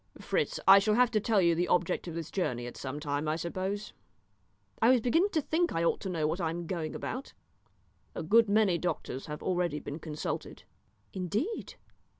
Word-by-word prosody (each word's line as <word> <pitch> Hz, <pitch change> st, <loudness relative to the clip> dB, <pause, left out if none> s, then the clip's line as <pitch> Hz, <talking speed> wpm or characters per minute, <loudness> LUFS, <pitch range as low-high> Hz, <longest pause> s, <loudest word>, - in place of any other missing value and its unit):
"Fritz, -, -, -1 dB
I 195 Hz, +1 st, +10 dB
shall 210 Hz, +2 st, +2 dB
have 245 Hz, 0 st, +4 dB
to 215 Hz, -, +2 dB
tell 210 Hz, -2 st, +2 dB
you 170 Hz, 0 st, +4 dB
the 175 Hz, +2 st, 0 dB
object 180 Hz, +1 st, +1 dB
of 165 Hz, -, -5 dB
this 165 Hz, -2 st, -5 dB
journey 125 Hz, -11 st, -1 dB
at 120 Hz, -, -7 dB
some 135 Hz, +2 st, -5 dB
time, 145 Hz, 0 st, -2 dB
I 155 Hz, -, +1 dB
suppose?" 190 Hz, +5 st, -4 dB, 0.9 s
"I 230 Hz, -, +6 dB
was 255 Hz, -1 st, +6 dB
beginning 325 Hz, -, +2 dB
to 315 Hz, -, +2 dB
think 335 Hz, +4 st, 0 dB
I 165 Hz, -, 0 dB
ought 170 Hz, -, +2 dB
to 195 Hz, -, -5 dB
know 165 Hz, -4 st, -1 dB
what 165 Hz, +4 st, -1 dB
I 165 Hz, -, 0 dB
am 170 Hz, +1 st, -4 dB
going 160 Hz, -3 st, -3 dB
about." 260 Hz, +4 st, -5 dB, 0.8 s
"A -, -, -3 dB
good 220 Hz, +6 st, +4 dB
many 200 Hz, -4 st, +3 dB
doctors 135 Hz, -6 st, -3 dB
have 150 Hz, 0 st, -6 dB
already 175 Hz, -4 st, 0 dB
been 145 Hz, +2 st, -6 dB
consulted." 155 Hz, -2 st, -5 dB, 0.5 s
"Indeed!" 210 Hz, -, -3 dB
180 Hz, 195 wpm, -30 LUFS, 160-215 Hz, 0.9 s, I